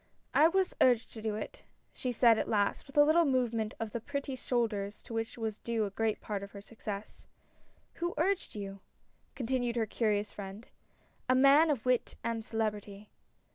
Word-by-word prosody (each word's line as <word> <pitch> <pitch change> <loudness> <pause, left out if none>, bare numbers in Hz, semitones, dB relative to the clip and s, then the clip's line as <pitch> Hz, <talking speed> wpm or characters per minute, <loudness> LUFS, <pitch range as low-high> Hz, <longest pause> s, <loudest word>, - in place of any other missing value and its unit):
" - - -42
I 310 - +7
was 375 +2 +1
urged 245 -3 +4
to 220 - -8
do 215 -1 -2
it," 210 - -6 0.3
she 255 - -3
said 235 -1 +5
at - - -2
last, 205 +3 +1
with 275 - -11
a 290 - +9
little 315 +3 +5
movement 240 -6 0
of 225 -1 -3
the 235 - -4
pretty 280 +1 -4
shoulders 215 -6 -2
to - - -9
which 225 +1 -3
was 220 -2 -3
due 230 -2 -1
a 200 - -5
great 220 +2 0
part 205 -2 -4
of 200 0 -9
her 200 - -8
success. 210 -1 -7 0.3
" - - -36
Who 345 +1 -1
urged 375 - 0
you? 195 -1 -6 0.3
" - - -40
continued 245 -1 -1
her 230 -2 +1
curious 210 -1 0
friend. 200 +3 -8 0.3
" - - -37
A 255 - +5
man 275 +5 +6
of 265 -7 -1
wit 250 -1 +1
and 230 -1 -2
celebrity." 210 -2 -3
225 Hz, 200 wpm, -32 LUFS, 210-255 Hz, 0.3 s, a